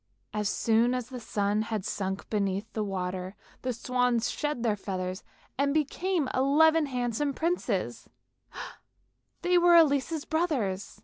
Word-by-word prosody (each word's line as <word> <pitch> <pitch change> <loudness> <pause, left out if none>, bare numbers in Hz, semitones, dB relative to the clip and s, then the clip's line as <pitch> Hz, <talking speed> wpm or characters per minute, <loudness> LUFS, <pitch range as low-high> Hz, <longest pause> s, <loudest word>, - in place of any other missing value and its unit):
As 210 -1 0
soon 230 +3 +2
as 250 -1 -4
the 255 -2 -6
sun 205 -2 0
had 215 -3 -3
sunk 190 0 -3
beneath 200 0 -1
the 215 - -1
water 185 -1 -3 0.3
the 255 - -1
swans 245 0 0
shed 295 -5 -2
their 220 -3 +2
feathers 185 -1 -4 0.4
and 280 +1 +2
became 315 +1 0
eleven 305 +4 +4
handsome 250 +2 -1
princes; 345 +2 -1 1.3
they 355 0 +4
were 345 0 +6
Elise's 310 -1 +3
brothers. 255 - -1
245 Hz, 130 wpm, -28 LUFS, 205-295 Hz, 1.3 s, were